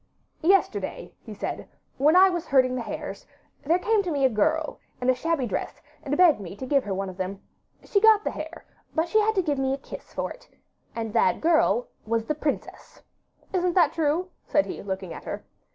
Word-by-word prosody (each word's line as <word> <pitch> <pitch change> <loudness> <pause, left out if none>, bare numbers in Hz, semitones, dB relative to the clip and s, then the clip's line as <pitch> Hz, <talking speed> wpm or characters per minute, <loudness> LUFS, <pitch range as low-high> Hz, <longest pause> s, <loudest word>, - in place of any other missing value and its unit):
'Yesterday,' 385 +4 +1
he - - -9
said, - - -5 0.3
'when 300 +5 +5
I 375 +1 +8
was 350 -3 -2
herding 255 -2 +4
the 255 - -2
hares, - - -6 0.4
there 330 +5 +3
came 430 +3 +2
to 370 - -4
me 285 -4 +1
a - - +5
girl, 310 +8 0 0.2
in 250 +1 +3
a - - +2
shabby 300 +1 -1
dress, 210 - -4 0.2
and 290 -1 -2
begged 350 -8 +6
me 190 -1 -8
to 260 - -6
give 275 0 +2
her 200 - -2
one 195 +1 -2
of 185 -1 -8
them. 190 +1 -4 0.4
She 400 - +1
got 435 -1 +6
the - - -1
hare, 320 +2 -8 0.3
but 320 +2 +1
she 435 - +3
had 435 +1 +2
to 380 - +2
give 290 -4 -1
me 265 0 +1
a - - -9
kiss - - -10
for - - -3
it; - - -13 0.5
AND 225 -2 -4
THAT 230 - +3
GIRL 315 -7 +3 0.2
WAS 225 0 0
THE 305 - 0
PRINCESS. 300 -1 -5 0.5
Isn't 360 -2 +1
that 360 - +4
true?' 330 +3 0 0.2
said 295 - +3
he, - - -6
looking 190 -3 -5
at - - -10
her. - - -5
295 Hz, 215 wpm, -26 LUFS, 245-350 Hz, 0.5 s, I